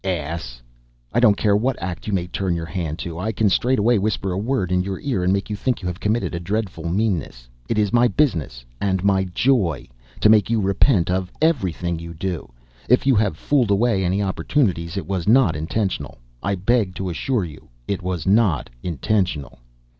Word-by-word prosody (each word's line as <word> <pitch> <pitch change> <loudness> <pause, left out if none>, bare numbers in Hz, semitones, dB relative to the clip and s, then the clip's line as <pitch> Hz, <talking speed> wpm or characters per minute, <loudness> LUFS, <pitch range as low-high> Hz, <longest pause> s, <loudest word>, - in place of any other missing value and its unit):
Ass! 80 -9 -4 0.5
I 120 - +3
don't 110 -4 +5
care 105 -2 +3
what 125 +5 0
act 85 +1 -5
you - - -1
may 90 -3 0
turn 90 0 -2
your 85 -1 -3
hand 80 -3 -4
to, 85 -1 -6
I 110 +5 -1
can 110 -1 +2
straightway 120 0 +2
whisper 100 -1 -1
a - - -2
word 110 -4 -1
in 90 0 +2
your 95 0 -4
ear 125 -10 -1
and 90 - +2
make 100 0 0
you 105 - -3
think 125 +3 -1
you - - -2
have 90 0 -4
committed 110 0 0
a 85 - -2
dreadful 90 -3 -3
meanness. 85 - -1 0.2
It 115 - 0
is 105 0 +1
my 120 0 +5
business 85 - 0 0.2
and 95 -2 0
my 95 -1 +3
joy 95 - +1 0.3
to - - +6
make 105 -1 +5
you 115 -1 +2
repent 95 -1 +2
of 90 0 -1
everything 90 - 0
you 85 0 -8
do. 85 -5 -4 0.4
If 125 +2 +4
I 130 -6 +5
have 95 -8 -1
fooled 130 - +1
away 100 -1 +2
any 95 +3 +1
opportunities 95 - 0
it 95 - -3
was 95 -3 -3
not 115 - +5
intentional; 95 +6 -2 0.2
I 100 0 0
beg 95 0 +1
to 95 -2 -3
assure 105 +5 -1
you 75 -4 -12 0.2
it 100 - -2
was 90 -3 -3
not 95 - +2
intentional!" 90 - -1
95 Hz, 200 wpm, -22 LUFS, 85-110 Hz, 0.5 s, to